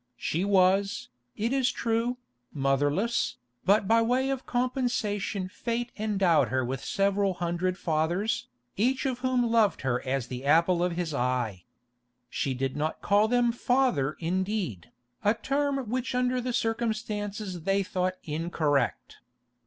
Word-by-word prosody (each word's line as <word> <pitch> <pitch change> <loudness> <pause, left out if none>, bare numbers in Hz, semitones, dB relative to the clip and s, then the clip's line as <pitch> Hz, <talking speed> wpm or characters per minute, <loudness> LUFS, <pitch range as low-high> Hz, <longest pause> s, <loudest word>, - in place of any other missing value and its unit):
She 170 +4 -1
was, 195 0 +2 0.3
it 230 +4 0
is 265 -2 +2
true, 230 +2 -1 0.3
motherless, 145 - +1 0.3
but 200 +1 +4
by 230 +2 +5
way 255 +4 +1
of 265 -1 -4
compensation 240 -6 -1
Fate 235 +5 -3
endowed 195 - +2
her 130 +2 0
with 130 +2 -4
several 195 +2 +1
hundred 175 +1 -1
fathers, 170 +6 0 0.3
each 255 +7 +1
of 255 -2 -1
whom 255 -1 +1
loved 230 -3 +2
her 130 -2 0
as 130 -2 -1
the 125 +1 -6
apple 170 +4 +4
of 180 -1 0
his 170 -2 -2
eye. 125 -8 -1 0.7
She 135 -2 -1
did 130 +1 -2
not 155 +2 -2
call 205 +2 +4
them 245 0 +3
"Father" 240 - +1
indeed, 185 - -2 0.3
a 210 +2 +3
term 280 +3 0
which 250 +2 -2
under 250 0 +1
the 250 +1 -2
circumstances 215 -5 -2
they 195 +4 +1
thought 185 0 -1
incorrect. 150 -4 -1
195 Hz, 135 wpm, -28 LUFS, 160-235 Hz, 0.7 s, by